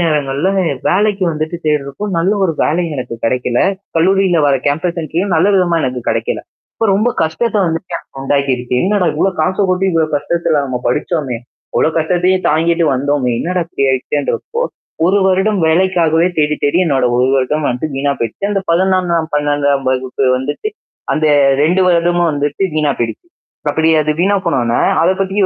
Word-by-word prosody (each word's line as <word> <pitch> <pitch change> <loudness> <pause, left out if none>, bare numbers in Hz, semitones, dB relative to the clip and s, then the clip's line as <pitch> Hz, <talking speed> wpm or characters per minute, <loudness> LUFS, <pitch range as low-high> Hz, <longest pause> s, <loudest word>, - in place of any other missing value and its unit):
நேரங்கள்ல, 150 +1 0 0.4
வேலைக்கு 200 0 +1
வந்துட்டு 155 +2 -3
தேடுறப்போ, 150 +4 -1
நல்ல 185 +5 +2
ஒரு 165 - +1
வேலையும் 165 0 -1
எனக்கு 120 -2 -5
கிடைக்கல. 125 0 0 0.4
கல்லூரியில 185 0 +3
வர 140 - +3
கேம்பஸ் 170 +4 -1
இன்டர்வ்யூவும் 170 +4 -1
நல்ல 180 +5 +3
விதமா 175 -3 +2
எனக்கு 125 -2 -3
கிடைக்கல. - - -2 0.4
அப்ப 225 - 0
ரொம்ப 215 +5 +2 0.2
கஷ்டத்த 210 +8 -1
வந்துட்டு 165 +2 -3
எனக்கு 135 - -13
உண்டாக்கிருக்கு. 135 -3 -1
என்னடா 195 -3 +1
இவ்வளோ 190 +5 +1
காச 185 +4 0
கொட்டி, 185 +1 +1
இவ்வளோ 160 -1 +1
கஷ்டத்துல 165 0 0
நம்ம 130 -2 -3
படிச்சோமே! 140 0 -1 0.4
இவ்வளோ - - +3
கஷ்டத்தையும் 180 +3 +1
தாங்கிட்டு 165 +2 +2
வந்தோமே! 135 -1 0
என்னடா 180 +1 -1
இப்படி 140 -5 -2
ஆயிடுச்சேன்றப்போ, 145 - -2 0.4
1 195 +3 +3
வருடம் 190 +1 +1
வேலைக்காகவே 170 -1 +2
தேடி 150 0 +2
தேடி 145 +4 +2
என்னோட 135 -5 +1
1 125 +1 +2
வருடம் 140 +3 0
வந்து 125 +5 -3
வீணா 140 +1 0
போயிருச்சு. 115 - -4
அந்த 195 -1 0
11ஆம் 185 +1 +2
வகுப்பு, 160 0 -4
12 145 -2 0
வகுப்பு 130 +1 -2
வந்துட்டு, 145 - -3 0.5
அந்த 155 0 +1 0.4
2 175 +5 +2
வருடமும் 175 0 +2
வந்துட்டு 145 +5 -2
வீணா 150 -2 +1
போயிடுச்சு. 115 +6 -3 0.4
அப்படி 160 +2 +1
அது 150 0 -1
வீணா 200 +2 +2
போனோன்ன, 120 -2 +1 0.2
அத 175 - +3
பத்தி 195 +1 -1
160 Hz, 160 wpm, -15 LUFS, 140-180 Hz, 0.5 s, கல்லூரியில